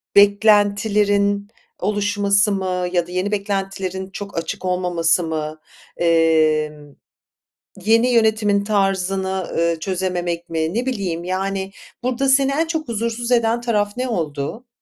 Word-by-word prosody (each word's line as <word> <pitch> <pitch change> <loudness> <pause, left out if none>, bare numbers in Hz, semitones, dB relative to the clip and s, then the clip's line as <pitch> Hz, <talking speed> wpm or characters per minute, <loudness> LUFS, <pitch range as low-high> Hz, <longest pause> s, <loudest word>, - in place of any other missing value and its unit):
beklentilerin 205 0 +3 0.3
oluşması 205 +1 +1
mı 185 -2 -1
ya 175 -1 +1
da 180 - -11
yeni 185 +3 -1
beklentilerin 195 -2 -3
çok 200 -2 -8
açık 165 +3 -4
olmaması 180 -2 +1
mı? 155 -1 -4 0.4
Emm, 155 -3 +2 0.9
yeni 230 +3 +4
yönetimin 220 -3 +2
tarzını, 190 -2 0
ııı, 170 -1 +1
çözememek 175 -1 -2
mi, 160 +2 -2
ne 245 +3 -1
bileyim, 185 -9 -2
yani, 190 +1 -2 0.3
burada 255 +2 0
seni, 270 0 +4
en 320 +4 +1
çok 320 -3 -3
huzursuz 235 +2 -2
eden 235 -1 +2
taraf 210 -3 -1
ne 255 0 -2
oldu? 165 - -3
195 Hz, 120 wpm, -20 LUFS, 175-215 Hz, 0.9 s, yeni